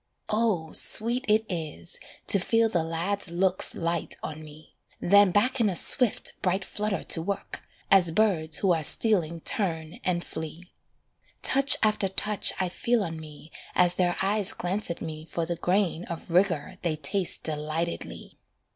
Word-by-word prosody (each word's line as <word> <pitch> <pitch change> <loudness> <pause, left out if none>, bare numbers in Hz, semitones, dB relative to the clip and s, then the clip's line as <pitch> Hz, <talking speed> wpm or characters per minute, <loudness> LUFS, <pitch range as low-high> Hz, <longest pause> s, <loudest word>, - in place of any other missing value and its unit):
Oh, 210 -7 0
sweet 240 +4 +3
it 215 +1 +2
is 170 -1 -5 0.3
To 200 - +5
feel 225 +4 +1
the 175 -6 0
lads' 170 +4 -2
looks 185 +2 +1
light 170 -1 -2
on 155 0 -6
me, 155 +1 -15 0.3
Then 200 +2 +5
back 240 +8 +1
in 215 - +3
a 185 - -3
swift, 245 +6 +2
bright 190 0 -1
flutter 210 -3 -3
to 165 - +3
work, 200 +4 -5 0.3
As 190 -3 +5
birds 165 -5 +2
who 190 -3 +2
are 160 -2 -2
stealing 170 -2 +2
turn 165 -6 -1
and 175 -2 -1
flee. 160 +3 -8 0.7
Touch 275 +1 +5
after 215 -2 +2
touch 205 +2 0
I 185 - 0
feel 235 +5 -1
on 165 -3 -6
me 155 0 -13 0.2
As 180 -1 +5
their 175 -1 0
eyes 200 0 +1
glance 190 +4 -2
at 170 - -5
me 155 -1 -7
for 165 +1 -4
the 170 +1 -3
grain 180 -1 -1
Of 170 0 -8
rigour 185 0 0
they 170 -4 -1
taste 165 +5 -1
delightedly. 155 +2 -3
180 Hz, 160 wpm, -26 LUFS, 165-205 Hz, 0.7 s, To